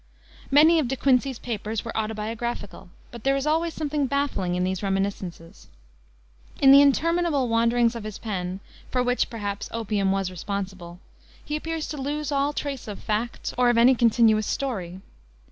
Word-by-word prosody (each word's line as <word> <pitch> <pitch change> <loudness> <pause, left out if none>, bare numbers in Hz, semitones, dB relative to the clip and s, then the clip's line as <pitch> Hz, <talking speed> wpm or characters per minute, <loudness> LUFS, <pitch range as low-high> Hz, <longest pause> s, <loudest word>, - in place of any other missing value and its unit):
Many 315 +4 +6
of 290 - 0
De 270 - -1
Quincey's 265 -1 +2
papers 220 -2 -4
were 230 - -6
autobiographical, 220 -2 -4 0.2
but 235 -2 -10
there 275 0 +2
is 275 +1 -2
always 320 +2 0
something 295 -2 -1
baffling 280 -11 -1
in 180 - 0
these 185 0 -2
reminiscences. 195 -4 -4 0.9
In 270 - +7
the 280 +1 +9
interminable 310 -1 +2
wanderings 230 +1 +2
of 230 - -6
his 215 -2 -6
pen 190 -4 -4 0.3
for 250 -1 0
which, 245 0 0
perhaps, 205 -3 -5
opium 210 -4 0
was 195 -1 -1
responsible 185 -1 -6 0.5
he 300 - -3
appears 325 0 -3
to 300 - -5
lose 295 +2 -3
all 280 +1 +1
trace 280 -4 -5
of 205 -2 -6
facts 220 +3 -3
or 245 -1 +5
of 240 - +2
any 240 +3 +6
continuous 225 -3 +3
story. 190 -9 -3
235 Hz, 160 wpm, -25 LUFS, 200-275 Hz, 0.9 s, the